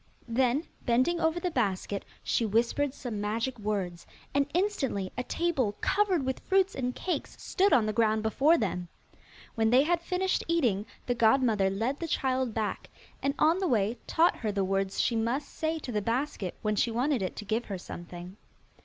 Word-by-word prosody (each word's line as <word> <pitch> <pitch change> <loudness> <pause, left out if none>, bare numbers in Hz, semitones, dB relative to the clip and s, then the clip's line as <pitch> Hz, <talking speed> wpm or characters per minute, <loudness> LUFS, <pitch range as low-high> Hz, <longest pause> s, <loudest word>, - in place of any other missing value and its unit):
Then, 250 +4 +2 0.2
bending 255 +9 +2
over 320 +1 +1
the 355 0 -2
basket, 200 -5 -1 0.2
she - - +1
whispered 235 +6 +1
some 235 -6 -5
magic 225 +4 -2
words, 195 -5 -3 0.3
and 280 0 +2
instantly 310 - 0
a 250 - -1
table 275 -10 0
covered 380 -8 +2
with 260 0 -2
fruits 385 0 +2
and 250 -1 -2
cakes 365 - -3
stood 390 +1 +1
on 230 - +5
the 215 - -1
ground 220 -1 +2
before 280 +9 +4
them. 180 -5 -2 0.7
When 225 -1 +2
they 255 +4 +6
had 340 +2 +1
finished 365 +2 0
eating, 240 - +1 0.2
the 245 - +1
godmother 225 -4 +3
led 225 +8 -1
the 335 - -3
child 260 -4 0
back, 215 -1 -3 0.3
and 275 +1 0
on 325 +3 +4
the 380 - 0
way 220 - +1
taught 335 +2 +3
her 215 -3 -2
the 200 -1 0
words 195 0 -1
she 235 - +2
must 235 +6 0
say 320 0 -2
to 280 -5 -6
the 210 -2 0
basket 230 - -2
when 215 -1 +1
she 220 - +2
wanted 250 +2 0
it 185 - -3
to 210 - -7
give 225 +3 -1
her 195 - -4
something. 175 +1 -9
240 Hz, 185 wpm, -29 LUFS, 210-300 Hz, 0.7 s, they